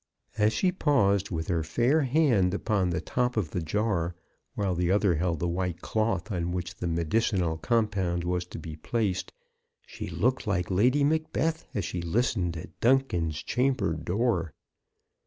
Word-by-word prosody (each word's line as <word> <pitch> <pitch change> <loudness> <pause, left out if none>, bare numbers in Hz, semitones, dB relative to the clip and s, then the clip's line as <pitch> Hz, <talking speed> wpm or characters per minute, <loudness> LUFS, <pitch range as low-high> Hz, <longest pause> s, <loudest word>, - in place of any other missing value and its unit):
As 105 0 +3
she 185 +8 +1
paused 100 - +2
with 80 -3 -3
her 85 -2 +1
fair 120 - +2
hand 125 - +3
upon 100 -4 0
the 90 +1 -1
top 125 +5 -1
of 90 -9 -1
the 90 - -2
jar, 90 0 -1 0.4
while 100 -3 0
the 90 0 0
other 100 -1 +3
held 85 +1 0
the 85 - 0
white 90 0 -2
cloth 110 -2 -1
on 85 -2 -1
which 90 -1 -3
the 90 - -4
medicinal 85 0 0
compound 100 -6 0
was 90 0 -1
to - - -8
be 80 -2 -7
placed, 95 +2 -2 0.5
she - - -7
looked 125 +1 0
like 90 -3 0
Lady 125 +10 +3
Macbeth 160 +2 0
as 100 -5 -1
she 90 - -3
listened 90 -2 0
at 80 0 -10
Duncan's 90 - +1
chamber 125 -8 +1
door. 85 - -1
95 Hz, 160 wpm, -28 LUFS, 85-120 Hz, 0.5 s, As